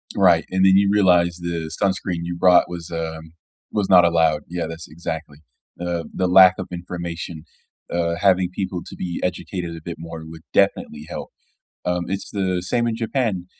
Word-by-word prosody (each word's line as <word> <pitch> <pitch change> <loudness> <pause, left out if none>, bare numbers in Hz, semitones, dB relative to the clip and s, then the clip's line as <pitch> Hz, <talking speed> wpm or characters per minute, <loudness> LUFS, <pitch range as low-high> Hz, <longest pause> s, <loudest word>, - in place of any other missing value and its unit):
Right, 90 -4 +4
and 95 0 +2
then 95 0 +6
you 100 0 +4
realize 90 -4 +4
the 85 -2 -3
sunscreen 95 -3 0
you 85 0 -4
brought 90 0 +5
was, 85 -2 -7
um 80 -1 -5 0.4
was 105 -2 -1
not 90 -2 +7
allowed. 80 -3 +2
Yeah, 85 0 -3
that's 80 0 -8
exactly, 75 -2 -6 0.4
uh, 85 -1 -2
the 95 - 0
lack 90 0 +8
of - - -5
information, 85 -2 -6 0.5
uh, 85 -1 0
having 95 -2 +3
people 95 -2 -3
to - - -9
be 90 -2 -4
educated 90 -1 -3
a 80 - -9
bit 85 - -6
more 80 -1 -8
would 80 0 -11
definitely 75 0 +1
help. - - -6 0.6
Um, 90 0 0
it's 95 +1 -4
the 95 -3 -1
same 120 +5 0
in 115 - 0
Japan, 115 -6 -1
90 Hz, 175 wpm, -22 LUFS, 85-95 Hz, 0.6 s, lack